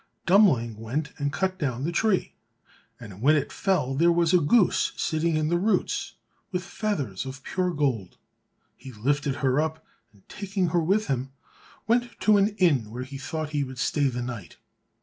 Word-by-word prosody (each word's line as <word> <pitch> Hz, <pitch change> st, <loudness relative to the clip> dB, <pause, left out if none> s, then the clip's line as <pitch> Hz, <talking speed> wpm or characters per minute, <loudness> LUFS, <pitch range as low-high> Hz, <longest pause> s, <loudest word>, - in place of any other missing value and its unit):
Dummling 150 Hz, -, +4 dB
went 135 Hz, +8 st, -3 dB
and 145 Hz, 0 st, -1 dB
cut 185 Hz, +4 st, -1 dB
down 130 Hz, -5 st, -2 dB
the 165 Hz, -, -1 dB
tree, 205 Hz, +1 st, +1 dB, 0.7 s
and 105 Hz, -3 st, -11 dB
when 150 Hz, +5 st, +5 dB
it 145 Hz, -2 st, -1 dB
fell 165 Hz, -10 st, 0 dB
there 170 Hz, +5 st, +4 dB
was 170 Hz, 0 st, +2 dB
a 180 Hz, -, +6 dB
goose 180 Hz, +6 st, +3 dB
sitting 160 Hz, +1 st, 0 dB
in 155 Hz, 0 st, 0 dB
the 175 Hz, +1 st, +2 dB
roots 215 Hz, +4 st, 0 dB, 0.4 s
with 180 Hz, -1 st, -2 dB
feathers 150 Hz, -, -3 dB
of 130 Hz, 0 st, -8 dB
pure 185 Hz, +3 st, -1 dB
gold. 130 Hz, -, -1 dB, 0.6 s
He 130 Hz, +1 st, -11 dB
lifted 140 Hz, +5 st, -1 dB
her 130 Hz, +3 st, +3 dB
up, 160 Hz, 0 st, -4 dB, 0.3 s
and 100 Hz, -2 st, -26 dB
taking 195 Hz, -3 st, -2 dB
her 170 Hz, +1 st, +2 dB
with 200 Hz, +6 st, +1 dB
him, 135 Hz, -2 st, -3 dB, 0.5 s
went 240 Hz, +2 st, 0 dB
to 215 Hz, -1 st, +5 dB
an 200 Hz, +1 st, +2 dB
inn 145 Hz, -, +2 dB
where 120 Hz, +3 st, -5 dB
he 135 Hz, +1 st, -8 dB
thought 155 Hz, +3 st, -4 dB
he 145 Hz, -2 st, 0 dB
would 130 Hz, -1 st, -8 dB
stay 140 Hz, +3 st, +1 dB
the 125 Hz, -2 st, -3 dB
night. 120 Hz, -7 st, -7 dB
150 Hz, 180 wpm, -26 LUFS, 130-180 Hz, 0.7 s, a